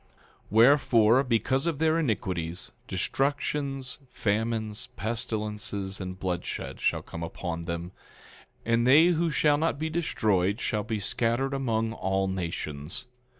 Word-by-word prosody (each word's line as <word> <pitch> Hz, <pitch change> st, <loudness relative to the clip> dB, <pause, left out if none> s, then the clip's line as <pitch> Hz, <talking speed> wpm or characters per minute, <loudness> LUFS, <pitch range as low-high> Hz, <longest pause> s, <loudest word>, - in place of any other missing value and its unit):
10:6 -, -, -34 dB, 0.4 s
Wherefore, 115 Hz, 0 st, +5 dB
because 130 Hz, +4 st, +1 dB
of 165 Hz, -4 st, 0 dB
their 160 Hz, +1 st, +2 dB
iniquities, 90 Hz, -, -2 dB, 0.2 s
destructions, 135 Hz, -1 st, -1 dB
famines, 110 Hz, 0 st, -1 dB
pestilences, 105 Hz, -3 st, -3 dB
and 95 Hz, 0 st, -6 dB
bloodshed 90 Hz, -2 st, -4 dB
shall -, -, +1 dB
come 85 Hz, -, -8 dB
upon 85 Hz, 0 st, -4 dB
them; 85 Hz, +1 st, -4 dB, 0.7 s
and 115 Hz, +1 st, +2 dB
they 155 Hz, +6 st, +7 dB
who 170 Hz, -1 st, +2 dB
shall 150 Hz, -1 st, +3 dB
not 160 Hz, -2 st, +1 dB
be 160 Hz, +2 st, -2 dB
destroyed 105 Hz, -, +1 dB
shall 105 Hz, -2 st, -1 dB
be 110 Hz, 0 st, -3 dB
scattered 120 Hz, +6 st, 0 dB
among 115 Hz, -4 st, 0 dB
all 95 Hz, -2 st, 0 dB
nations. 85 Hz, -, -4 dB
115 Hz, 125 wpm, -28 LUFS, 95-135 Hz, 0.7 s, they